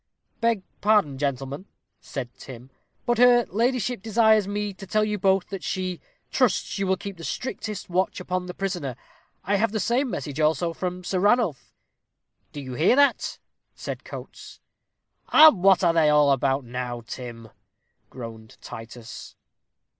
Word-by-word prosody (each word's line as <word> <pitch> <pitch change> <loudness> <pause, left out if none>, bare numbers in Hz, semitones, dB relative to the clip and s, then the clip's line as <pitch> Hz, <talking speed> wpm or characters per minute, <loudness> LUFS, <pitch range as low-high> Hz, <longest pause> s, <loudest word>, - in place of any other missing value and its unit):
"Beg 230 -4 +1 0.2
pardon, 200 -11 +3
gentlemen," 140 +4 -3 0.3
said 125 -3 -6
Tim, 130 0 -12 0.3
"but 240 -1 +1
her 245 -1 +6
ladyship 240 +1 0
desires 220 -1 +3
me 205 0 -2
to 195 +1 -11
tell 215 +2 +2
you 210 -1 -1
both, 190 -1 +2
that 195 -2 -6
she 185 -2 -3 0.3
trusts - - +1
you 195 - 0
will 190 0 +2
keep 195 0 -7
the 165 - -10
strictest 215 -1 -4
watch 185 +2 0
upon 180 0 -3
the 180 - -7
prisoner. 175 -10 -3 0.5
I 200 +3 +1
have 220 +1 +1
the 215 - -1
same 250 +5 +1
message 145 - -5
also 160 +2 +1
from 180 +1 -4
Sir 185 +1 -1
Ranulph." 200 - +1 0.8
"Do 145 - -7
you 130 -2 -7
hear 160 - +3
that?" 285 0 +2 0.4
said - - -6
Coates. - - -10 0.7
"And 310 - +8
what 190 -1 +5
are 170 -1 +4
they 160 -2 +4
all 150 -1 +5
about 135 0 +1
now, 120 0 -4
Tim?" 115 -1 -8 0.6
groaned 115 -3 -10
Titus. 115 +1 -10
185 Hz, 155 wpm, -25 LUFS, 135-210 Hz, 0.8 s, And